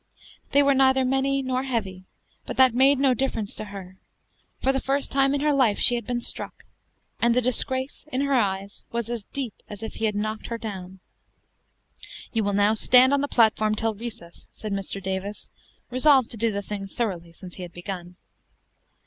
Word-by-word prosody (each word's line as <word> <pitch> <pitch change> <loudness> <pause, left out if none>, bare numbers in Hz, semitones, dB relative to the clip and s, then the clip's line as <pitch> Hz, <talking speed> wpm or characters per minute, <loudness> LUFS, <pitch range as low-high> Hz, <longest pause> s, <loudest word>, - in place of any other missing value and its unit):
They 285 +1 +5
were 280 0 +4
neither 265 -1 +4
many 270 +1 +1
nor 255 0 -1
heavy, 200 -8 -3 0.4
but - - -5
that 260 -2 +6
made 270 +3 +5
no 270 -1 +3
difference 230 -4 -2
to 215 - -5
her. 190 -2 -10 0.6
For 265 - +2
the 270 - -1
first 275 +1 -1
time 275 0 +3
in 280 - -1
her 300 0 +2
life 250 -7 +3
she - - +5
had 235 -3 -3
been 245 -1 -1
struck; - - -3 0.5
and 235 0 +3
the - - +4
disgrace, 260 +2 -1
in 260 - 0
her 280 0 0
eyes, 200 -4 -1
was 235 0 -3
as 230 -4 -4
deep 260 -6 -5 0.2
as 210 0 -8
if 220 - -5
he 225 - -2
had 210 -1 0
knocked 215 +1 -3
her 230 - -3
down. 190 -4 -7 1.3
"You 225 -2 +1
will 205 0 0
now 205 +2 +3
stand 250 +4 +5
on 280 - +3
the 285 - -1
platform 215 -3 +3
till 225 0 -1
recess," 205 -6 -9
said 215 -2 -6
Mr. 195 0 -3
Davis, 190 +2 -4 0.4
resolved 260 -1 +4
to 230 - -5
do 225 +1 +1
the 200 0 -3
thing 200 0 -5
thoroughly, 185 -6 -3
since 180 +1 -12
he - - -8
had 175 -1 -7
begun. 175 0 -7
230 Hz, 195 wpm, -25 LUFS, 200-260 Hz, 1.3 s, that